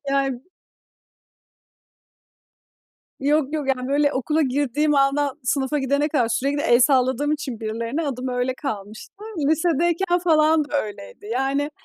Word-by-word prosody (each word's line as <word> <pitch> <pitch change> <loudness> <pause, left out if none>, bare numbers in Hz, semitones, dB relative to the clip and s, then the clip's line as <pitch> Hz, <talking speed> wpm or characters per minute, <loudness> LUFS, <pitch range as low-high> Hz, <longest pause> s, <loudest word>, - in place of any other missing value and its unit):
Ya 275 -1 +1 2.9
Yok 290 +1 +1
yok, 300 -3 -2
yani, 255 -1 -1
böyle, 285 +1 +2
okula 305 +5 0
girdiğim 290 +2 +1
andan 280 0 +1
sınıfa 270 +3 0
gidene 280 +2 +1
kadar 255 -7 +1
sürekli 280 +5 0
el 240 -6 +4
salladığım 265 +2 +2
için 280 -7 -4
birilerine 230 +7 -3
adım 255 -1 -3
öyle 250 +1 -1
kalmıştı. 215 -8 -6 0.4
Lisedeyken 345 +3 +1
falan 310 -2 +4
da 290 0 -1
öyleydi. 205 - -10
Yani 275 +4 0
275 Hz, 120 wpm, -22 LUFS, 255-300 Hz, 2.9 s, el